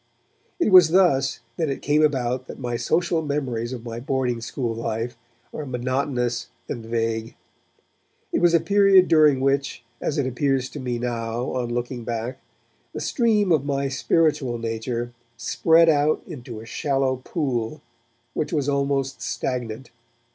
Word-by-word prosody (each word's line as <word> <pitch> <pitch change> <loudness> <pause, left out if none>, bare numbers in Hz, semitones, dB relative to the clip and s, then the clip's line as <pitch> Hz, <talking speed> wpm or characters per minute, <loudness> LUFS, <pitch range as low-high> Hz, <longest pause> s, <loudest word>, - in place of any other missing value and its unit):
It 280 - +2
was 180 -4 +9
thus 160 -7 +3 0.2
that 160 -3 0
it 135 - -4
came 150 +1 +3
about 130 -4 +1
that - - -8
my 120 -2 -3
social 165 +6 +1
memories 130 -6 -2
of 120 -2 -7
my 115 0 -5
boarding 125 -2 -1
school 120 0 -3
life 115 +1 -3 0.4
are 155 - -4
monotonous 125 -1 -1 0.2
and 115 - -5
vague. 115 0 -2 1.0
It - - +1
was 175 -1 +5
a - - +6
period 195 +2 +5
during 155 -4 +5
which, 135 -2 0 0.2
as 150 - -1
it 140 - +1
appears 130 0 0
to 150 - -8
me 125 -2 -2
now 120 0 -3
on 125 -2 -2
looking 120 0 -3
back, 120 +3 -4 0.5
the - - -4
stream 215 -6 +2
of 155 -4 +3
my 140 -1 -1
spiritual 140 -3 +1
nature 115 +1 -3 0.2
spread 165 +7 +4
out 150 -1 +3
into 125 -8 -8
a - - -11
shallow 135 +1 0
pool 125 -5 -3 0.5
which - - -2
was 145 -2 0
almost 140 -1 0
stagnant. 125 -1 -4
130 Hz, 150 wpm, -24 LUFS, 120-150 Hz, 1.0 s, was